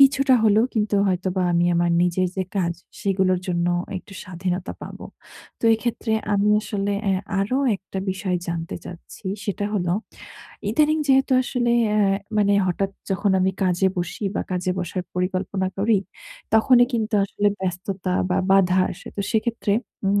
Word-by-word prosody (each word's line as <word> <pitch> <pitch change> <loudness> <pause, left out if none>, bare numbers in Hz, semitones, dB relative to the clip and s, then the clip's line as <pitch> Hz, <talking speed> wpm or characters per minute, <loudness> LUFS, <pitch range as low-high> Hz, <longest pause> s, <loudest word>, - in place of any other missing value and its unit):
কিছুটা 275 -1 +6
হলেও 215 +1 +4
কিন্তু 210 -1 0
হয়তোবা 185 0 0
আমি 170 0 +3
আমার 170 0 +2
নিজের 180 +1 +1
যে 190 - +1
কাজ 170 -3 +1 0.3
সেগুলোর 190 -2 +1
জন্য 170 -1 0 0.3
একটু 195 - -15
স্বাধীনতা 180 0 -3
পাবো। - - -8 0.5
তো - - -6
এক্ষেত্রে 225 0 -2 0.2
আমি 200 +1 +2
আসলে 205 -1 -2
অ্যা 190 -1 +2 0.2
আরো 210 +7 0 0.2
একটা 190 0 -8
বিষয় 185 -1 -1
জানতে 165 -1 -3
চাচ্ছি 180 +3 -11 0.2
সেটা 205 -1 -2
হলো 175 -4 0 0.8
ইদানিং 305 +5 +3
যেহেতু 270 0 +4
আসলে 245 -2 -1 0.2
অ্যা 210 - +2 0.4
মানে 205 -1 +3
হঠাৎ 195 +2 0 0.2
যখন 195 +1 +1
আমি 190 - +3
কাজে 185 +1 +2
বসি 175 +4 -3
বা - - 0
কাজে 185 0 -1
বসার 180 +1 -3
পরিকল্পনা 185 +1 -1
করি 210 +1 +3 0.6
তখনই 245 +2 +6
কিন্তু 220 -1 -1
আসলে 205 +1 0
ব্যস্ততা 185 0 -3 0.2
বা 180 - +2
বাধা 190 -1 +4
আসে। - - -11
তো - - -1
সেক্ষেত্রে 225 -2 0 0.3
উম 200 +1 +3
195 Hz, 150 wpm, -23 LUFS, 180-215 Hz, 0.8 s, কিছুটা